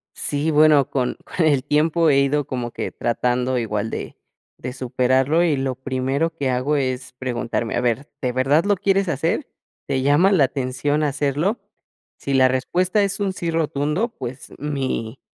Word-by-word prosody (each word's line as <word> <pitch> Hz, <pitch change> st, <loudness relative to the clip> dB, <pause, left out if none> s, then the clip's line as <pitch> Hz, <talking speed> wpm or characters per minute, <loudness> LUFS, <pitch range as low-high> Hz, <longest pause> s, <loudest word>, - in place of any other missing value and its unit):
Sí, 145 Hz, +2 st, -1 dB
bueno, 150 Hz, -2 st, +5 dB
con 125 Hz, -2 st, -1 dB
con 170 Hz, -, -1 dB
el 145 Hz, -4 st, +3 dB
tiempo 155 Hz, +3 st, +2 dB
he 140 Hz, -1 st, +4 dB
ido 140 Hz, +1 st, +1 dB
como 125 Hz, -2 st, -4 dB
que -, -, -4 dB
tratando 125 Hz, +2 st, 0 dB
igual 110 Hz, -2 st, -2 dB
de -, -, -6 dB, 0.4 s
de 125 Hz, -, -6 dB
superarlo 130 Hz, +4 st, +1 dB
y 165 Hz, -4 st, +2 dB
lo 135 Hz, -1 st, -2 dB
primero 135 Hz, +5 st, -2 dB
que 140 Hz, -4 st, -1 dB
hago 130 Hz, +4 st, 0 dB
es 130 Hz, -2 st, -2 dB
preguntarme: 120 Hz, -2 st, -3 dB
"A -, -, +1 dB
ver, 125 Hz, +4 st, -1 dB
¿de 125 Hz, -3 st, 0 dB
verdad 140 Hz, +7 st, +2 dB
lo 205 Hz, 0 st, +3 dB
quieres 195 Hz, +1 st, +1 dB
hacer? 165 Hz, -, -1 dB, 0.4 s
¿Te 135 Hz, -2 st, 0 dB
llama 145 Hz, +8 st, +4 dB
la 165 Hz, -8 st, +5 dB
atención 135 Hz, +3 st, -1 dB
hacerlo?". 145 Hz, -, 0 dB, 0.6 s
Si 140 Hz, -, -4 dB
la 130 Hz, -1 st, +5 dB
respuesta 180 Hz, +10 st, +1 dB
es 200 Hz, +1 st, -1 dB
un 200 Hz, -1 st, +1 dB
sí 170 Hz, -2 st, -3 dB
rotundo, 155 Hz, +5 st, 0 dB
pues 125 Hz, +1 st, -7 dB
mi 135 Hz, -4 st, -3 dB
140 Hz, 170 wpm, -22 LUFS, 130-155 Hz, 0.6 s, bueno